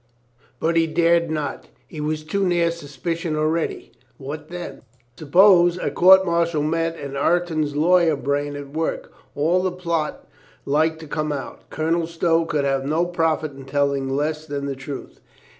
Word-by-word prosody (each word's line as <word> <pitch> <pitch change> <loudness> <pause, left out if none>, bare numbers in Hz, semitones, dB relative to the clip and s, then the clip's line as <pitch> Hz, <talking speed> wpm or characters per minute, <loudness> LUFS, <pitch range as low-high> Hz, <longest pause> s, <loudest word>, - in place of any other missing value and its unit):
But 165 +1 +1
he 165 0 +3
dared 170 +1 +2
not. 155 -2 -4 0.2
He 155 - -8
was 155 0 -2
too 195 +6 -1
near 175 -2 +2
suspicion 165 +1 -4
already. 155 +2 -1 0.3
What 145 +3 -7
then? 175 0 -7 0.4
Sup 150 -3 -10
pose 175 -1 +6
a - - -2
court 190 +1 +6
martial 170 -3 +1
met 165 +2 -1
and 140 -2 -7
Ireton's 155 -1 0
lawyer 170 +1 +4
brain 145 +2 -2
at^vork. 145 +3 -4 0.3
All 165 +5 +2
the 185 0 0
plot 170 -4 -3 0.4
was 140 - -2
like 160 +2 +2
to 160 - -9
come 155 +1 -2
out. 140 -2 -7
Colonel 165 +1 -1
Stow 165 0 +1
could 150 -3 -1
have 135 -1 0
no 155 +5 +1
profit 160 -3 0
in 135 -1 -12
telling 140 -1 0
less 155 +3 -2
than 140 -1 -4
the 140 -1 -3
truth. 135 +1 -8
160 Hz, 165 wpm, -22 LUFS, 145-170 Hz, 0.4 s, pose